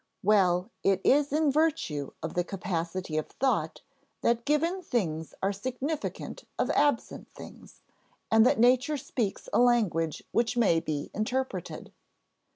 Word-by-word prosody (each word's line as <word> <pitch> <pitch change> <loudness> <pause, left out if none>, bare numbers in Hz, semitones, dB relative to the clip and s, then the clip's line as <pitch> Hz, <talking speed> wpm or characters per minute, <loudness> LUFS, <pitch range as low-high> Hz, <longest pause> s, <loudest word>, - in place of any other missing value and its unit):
Well, 190 -1 +3
it 195 -1 +2
is 285 +1 +3
in 305 0 +2
virtue 275 - 0
of 160 - -4
the 175 - +1
capacity 180 -3 -3
of 155 - -5
thought 270 0 -1 0.4
that 235 0 +1
given 330 +6 +1
things 165 - -2
are 195 +1 +1
significant 260 +9 -4
of - - +1
absent 290 -6 0
things, - - -13 0.5
and 220 0 +6
that 265 +4 +4
nature 255 +5 +4
speaks 235 -6 -3
a - - +4
language 210 -10 +2
which 235 +1 0
may 200 -8 +4
be 155 -3 -4
interpreted. 260 +5 -3
225 Hz, 135 wpm, -28 LUFS, 180-270 Hz, 0.5 s, and